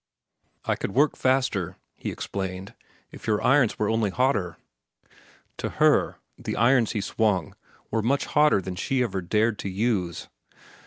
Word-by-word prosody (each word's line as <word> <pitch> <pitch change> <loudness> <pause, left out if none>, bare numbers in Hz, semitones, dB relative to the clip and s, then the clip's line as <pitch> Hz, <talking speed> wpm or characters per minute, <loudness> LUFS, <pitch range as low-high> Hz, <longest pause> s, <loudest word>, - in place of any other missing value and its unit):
"I - - +1
could 95 - -5
work 145 +2 +3
faster," 130 -9 0 0.2
he - - -5
explained, 95 0 -5 0.4
"if - - -11
your 105 -1 +2
irons 130 -4 +3
were 105 - 0
only 110 -1 +1
hotter." 105 -6 0 1.0
To - - -3
her, - - +3 0.2
the - - -4
irons 120 0 +3
he 105 - -1
swung 105 -5 0 0.4
were 115 - +1
much 135 +5 +1
hotter 150 -9 +3
than 95 - -4
she 130 +7 0
ever 100 -5 -2
dared 105 +4 +1
to 100 - -4
use. 95 -4 -1
110 Hz, 150 wpm, -25 LUFS, 95-125 Hz, 1.0 s, work